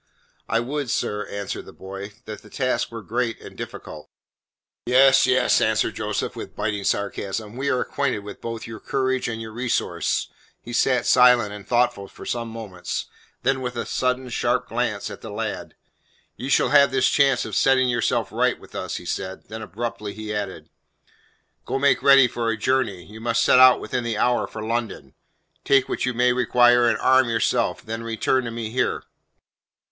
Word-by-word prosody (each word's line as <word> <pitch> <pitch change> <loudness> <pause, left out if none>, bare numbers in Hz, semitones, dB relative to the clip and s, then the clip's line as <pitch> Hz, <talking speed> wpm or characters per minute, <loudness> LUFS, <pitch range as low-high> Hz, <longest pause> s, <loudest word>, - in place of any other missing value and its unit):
"I 115 - +2
would, 135 +2 -3
sir," 105 -1 -2
answered 100 -1 -5
the - - -11
boy, 95 +2 -8
"that 110 -1 -8
the 105 - -16
task 125 -2 -1
were 115 -2 -7
great 115 0 -2
and - - -12
difficult." - - -9 0.8
"Yes, 135 +1 +6
yes," 130 0 +3
answered - - +1
Joseph - - -3
with - - -8
biting 105 -1 -2
sarcasm, 100 +2 -2
"we 140 +2 -2
are 125 - +1
acquainted 140 -7 -1
with 100 0 -10
both 115 -1 -5
your 110 -1 -8
courage 130 -1 -1
and 115 -1 -4
your 110 -1 -7
resource." 120 +2 -1 0.3
He 120 - -10
sat 125 0 +2
silent 125 -4 +5
and 105 -1 -10
thoughtful 120 -5 +1
for - - -12
some 120 -1 -3
moments, 110 -6 -5 0.4
then 130 +1 +1
with 125 -1 -4
a 115 - -3
sudden 125 0 -1
sharp - - 0
glance - - -2
at - - -9
the - - -8
lad: - - -5 0.6
"You 130 - -6
shall 125 - +3
have 140 0 +6
this 130 0 +2
chance 135 -3 +3
of 110 - -7
setting 130 +2 +4
yourself 120 -2 0
right - - +1
with - - -16
us," - - -4
he - - -7
said. 95 0 -5
Then 110 +1 -7
abruptly 110 -1 -5
he 110 0 -5
added. 100 -2 -5 0.9
"Go - - -2
make 140 +1 +3
ready 135 -2 +7
for 115 -1 -2
a 115 - -1
journey. 105 -6 0
You 110 +2 -12
must 115 0 +1
set 125 - +5
out 130 -1 +8
within 125 - -3
the 115 -2 -2
hour 120 +3 +1
for 110 - -7
London. 110 - -3 0.5
Take 135 -2 +3
what - - -2
you 125 - -1
may 125 +1 +3
require 120 -1 +4
and - - +1
arm 130 -1 +4
yourself; 115 - 0
then 115 +1 -5
return 115 +3 0
to - - -3
me 115 -1 -5
here." 125 - -1
120 Hz, 185 wpm, -23 LUFS, 110-130 Hz, 0.9 s, out